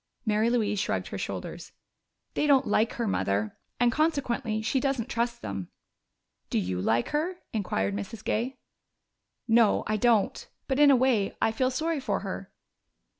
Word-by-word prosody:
Mary 215 +1 +2
Louise 215 -4 +1
shrugged - - -1
her - - -5
shoulders. - - -6 0.6
"They 300 - +1
don't 275 -2 +5
like 220 +2 +2
her, 235 -2 -2
Mother 105 - -1 0.2
and 240 0 +4
consequently 245 -8 0
she 265 +4 +1
doesn't 265 -3 -1
trust 235 0 -2
them." 95 -3 -5 0.8
"Do - - 0
you 90 0 -1
like 115 +4 +1
her?" 320 +5 -1 0.2
inquired 100 - -1
Mrs. 150 - -6
Gay. 250 +4 -1 0.9
"No, 225 -2 +4
I 215 0 0
don't. 225 -1 +2 0.2
But 265 0 0
in 295 -1 +7
a 275 - +7
way 245 -6 +2
I 225 - +2
feel 255 +3 +1
sorry 315 +4 -1
for 265 - -1
her." 195 -1 -6
230 Hz, 160 wpm, -28 LUFS, 205-265 Hz, 0.9 s, in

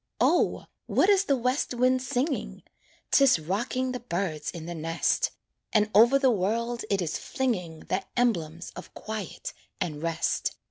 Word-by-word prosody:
O! - - +2 0.2
what 390 - +3
is 395 -1 +4
the 280 - +3
west 255 +1 0
wind 255 +1 +3
singing? 260 +4 -2 0.5
'Tis 275 -7 +6
rocking 240 - -2
the 250 - -4
birds 170 -9 -3
in 165 -2 -7
the 175 - -5
nest, 165 - 0 0.4
And 210 -1 +3
over 235 +6 +7
the 270 -2 +4
world 230 +4 -1
it 195 -2 +1
is 160 - -3
flinging 180 -12 -2
The 190 +1 -2
emblems 170 -9 0
of 180 - -10
quiet 215 -4 -6 0.3
and 150 -3 -3
rest. 165 0 -1
215 Hz, 150 wpm, -27 LUFS, 170-255 Hz, 0.5 s, over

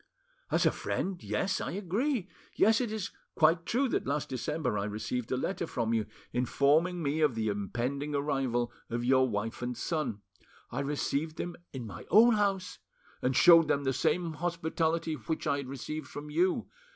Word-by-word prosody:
"As - - +2
a - - +5
friend, 185 -2 -3
yes, 190 0 -1
I - - -3
agree. 205 - -1 0.3
Yes, 225 +3 +4
it 240 -4 -2
is 215 -3 -3 0.2
quite 165 +1 +3
true 265 +4 +2
that - - -1
last 145 +1 -1
December 135 -1 -2
I 100 - -1
received 110 +3 -3
a 130 - +1
letter 170 +4 -2
from 115 -5 -1
you 110 -2 0 0.3
informing 155 +8 +2
me 150 +2 0
of 150 -6 +3
the 110 -1 0
impending 125 +8 -2
arrival 135 -4 0 0.2
of 120 +1 -2
your 130 0 +4
wife 110 +2 -3
and 125 -1 -3
son. 125 -8 -2 0.5
I - - -3
received 145 +2 -1
them 175 0 -4 0.2
in 130 -3 -6
my 95 -5 -9
own 230 +4 +7
house, 200 -3 0 0.4
and 130 +1 +1
showed 165 +2 +8
them 140 - +1
the 135 -1 +1
same 170 +5 0
hospitality 165 0 -1
which 155 +3 -4
I 140 - +2
had 140 -2 -5
received 140 +3 -5
from 145 +3 -8
you. 175 +4 +1
150 Hz, 175 wpm, -30 LUFS, 125-175 Hz, 0.5 s, showed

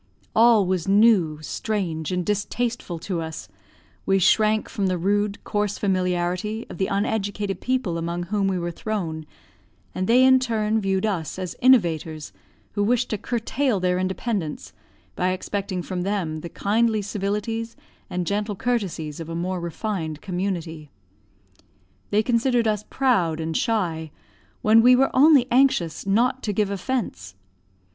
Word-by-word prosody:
All 225 -3 +6
was 185 -1 -1
new, 195 -6 +4
strange, 170 -5 -3
and 180 -1 -1
distasteful 210 -2 -2
to 170 +1 -3
us; 160 0 -6 0.6
we 195 - +2
shrank 215 +3 +3
from 200 -2 -2
the 185 -1 0
rude, 205 +3 0
coarse 205 -1 -1
familiarity 185 +2 -1
of - - -9
the 190 - +1
uneducated 200 -2 -2
people 250 -10 -1
among 170 +1 -3
whom 195 +2 0
we 190 -1 0
were 175 0 -3
thrown; 165 -6 -4 0.7
and 185 0 -2
they 245 +3 +5
in 260 0 +6
return 220 -3 0
viewed 195 0 0
us 185 -7 -2
as 185 -2 -5
innovators, 165 - +2 0.4
who 205 - -1
wished 240 +3 +1
to 215 - 0
curtail 240 +1 -1
their 180 0 +1
independence, 185 -3 -3 0.4
by 185 +1 +1
expecting 190 -1 -3
from 180 0 -4
them 180 -5 -2
the 170 - -7
kindly 215 +2 +1
civilities 210 +3 -3 0.3
and 180 0 -2
gentle 205 +2 -1
courtesies 185 -10 -2
of 165 0 -7
a 165 - -4
more 180 +2 -2
refined 170 -2 -4
community. 175 -5 -4 1.2
They 210 +1 +2
considered 240 0 +2
us 210 -1 0
proud 190 -12 +1
and 160 0 -3
shy, 170 -8 -1 0.5
when 220 +1 +6
we 250 +2 +7
were 270 +2 +2
only 280 -1 +6
anxious 240 - +2
not 240 +6 +2
to 210 - -2
give 205 0 0
offense. 185 - -3
200 Hz, 145 wpm, -24 LUFS, 175-220 Hz, 1.2 s, we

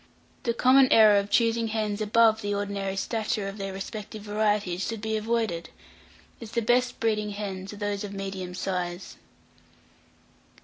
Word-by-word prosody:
The 235 -1 -1
common 260 +2 +5
error 215 -2 +7
of 200 0 -4
choosing 230 0 +2
hens 215 -1 -2
above 220 +1 +4
the 205 -1 -2
ordinary 200 -1 -3
stature 210 0 -2
of 195 +1 -7
their 195 0 -3
respective 210 +2 -7
varieties 210 -3 0
should 225 -1 -4
be 220 +1 -2
avoided, 220 -6 -1 0.7
as 230 -1 -9
the 235 - 0
best 245 +2 +2
breeding 210 -2 0
hens 195 -2 -5
are - - -9
those 205 0 -2
of 205 - -6
medium 195 -2 -5
size. 180 -1 -4
210 Hz, 150 wpm, -27 LUFS, 195-225 Hz, 0.7 s, error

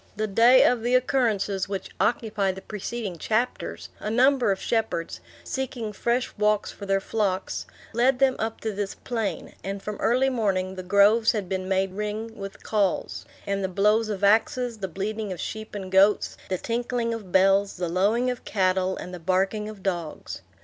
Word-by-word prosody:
The 215 +1 -1
day 230 +5 +6
of 245 -2 +3
the 240 +2 +2
occurrences 220 -7 +1
which 195 -1 -4
occupy 210 -5 +1
the 190 +1 -10
preceding 210 -3 -5
chapters, 230 +7 -2
a 210 - -4
number 250 0 +4
of 190 - -1
shepherds, 220 -8 -1 0.2
seeking 245 -5 -4
fresh 240 +4 -1
walks 210 0 +2
for 200 - -9
their 195 0 +2
flocks, 195 -2 -2 0.3
led 250 +3 +3
them 265 0 +3
up 225 0 -2
to 220 - -2
this 200 -1 -3
plain; 225 -5 -3
and 195 +1 -4
from 210 -1 -4
early 255 +3 +2
morning 190 -6 0
the 185 - -6
groves 200 +4 +4
had 205 -4 -2
been 185 0 -3
made 190 0 +1
ring 210 +2 -4
with 195 -2 -8
calls, 205 -4 -1 0.2
and 200 0 -1
the - - +1
blows 210 +4 +2
of 205 -2 -4
axes, 225 +3 +2
the 190 - -2
bleating 205 +4 -4
of 180 - -5
sheep 220 0 -6
and 190 -2 -6
goats, 195 +2 +4
the 185 - 0
tinkling 235 +2 -1
of 210 -5 -7
bells, 195 +1 +3
the 175 0 -2
lowing 210 +9 +2
of 250 - -7
cattle, 185 -1 +1
and 180 - -7
the 180 - -6
barking 190 +5 0
of 205 -3 -11
dogs. 175 -5 -4
210 Hz, 180 wpm, -25 LUFS, 190-230 Hz, 0.3 s, day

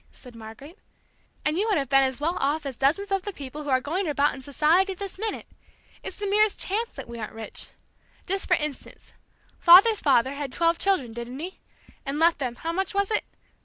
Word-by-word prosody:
said 250 -2 -15
Margaret; 230 - -12 0.7
"and 305 +3 +1
you 425 - +1
would 420 - +2
have 275 -3 -2
been 270 0 +5
as 265 -1 -1
well 330 +4 -1
off 295 +2 0
as 270 -2 -4
dozens 335 +11 0
of 390 -1 +1
the 410 - -5
people 290 -3 -8
who 295 - -6
are 260 -1 +3
going 340 +8 -2
about 290 -1 +2
in 265 - -9
society 320 +8 +2
this 390 0 -7
minute! 440 0 -3 0.6
It's - - -7
the 415 - -4
merest 420 +1 +2
chance 450 +5 -1
that - - -8
we 235 0 -8
aren't 215 - -6
rich. 220 -1 -5 0.6
Just 390 +1 -2
for 360 - +4
instance: 300 -4 -6 0.5
father's 395 +5 +7
father 265 -2 +3
had 280 -2 -5
twelve 335 +2 +1
children, 330 - 0
didn't 240 +2 -7
he? 355 +6 -7 0.4
and 275 0 -3
left 330 0 +3
them 250 -4 -3
how 330 +7 -4
much 385 +3 -2
was 400 +1 +1
it? 425 - 0
305 Hz, 210 wpm, -25 LUFS, 270-385 Hz, 0.7 s, father's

